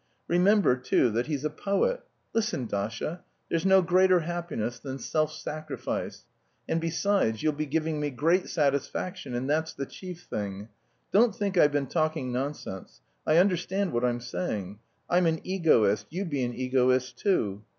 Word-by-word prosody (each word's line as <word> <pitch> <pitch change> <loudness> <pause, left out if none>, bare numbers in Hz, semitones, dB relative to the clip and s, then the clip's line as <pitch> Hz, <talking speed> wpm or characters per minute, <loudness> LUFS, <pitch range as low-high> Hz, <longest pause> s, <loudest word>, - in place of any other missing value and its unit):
Remember, 180 -3 +4
too, 125 -1 +2
that 120 +4 -1
he's 150 -2 -2
a - - +2
poet. 345 - 0 0.3
Listen, 215 - 0
Dasha, 115 - -3 0.3
there's 165 +3 +1
no 190 -1 +6
greater 185 +1 +4
happiness 160 -9 -3
than 135 -1 -6
self 155 +5 0
sacrifice. 155 -1 -5 0.4
And 165 - 0
besides, 165 - +1
you'll 155 - +2
be 150 +1 -3
giving 160 +1 -1
me 150 0 -1
great 165 +7 +1
satisfaction 140 -1 -1
and 125 +2 -2
that's 160 +1 0
the 140 - -4
chief 180 +3 -9
thing. 100 - -5 0.4
Don't 220 0 +4
think 200 -2 -2
I've 150 -4 +5
been 145 -1 0
talking 155 -4 -1
nonsense. 125 -7 -5 0.3
I 155 - +4
understand 185 +1 +2
what 120 +1 0
I'm 120 -1 +1
saying. 105 - -4 0.3
I'm 175 0 +3
an 160 -1 +1
egoist, 115 - +2
you 185 +5 -3
be 145 -6 -1
an 120 0 -4
egoist, 130 0 +1
too. 105 - +1
155 Hz, 160 wpm, -28 LUFS, 125-180 Hz, 0.4 s, no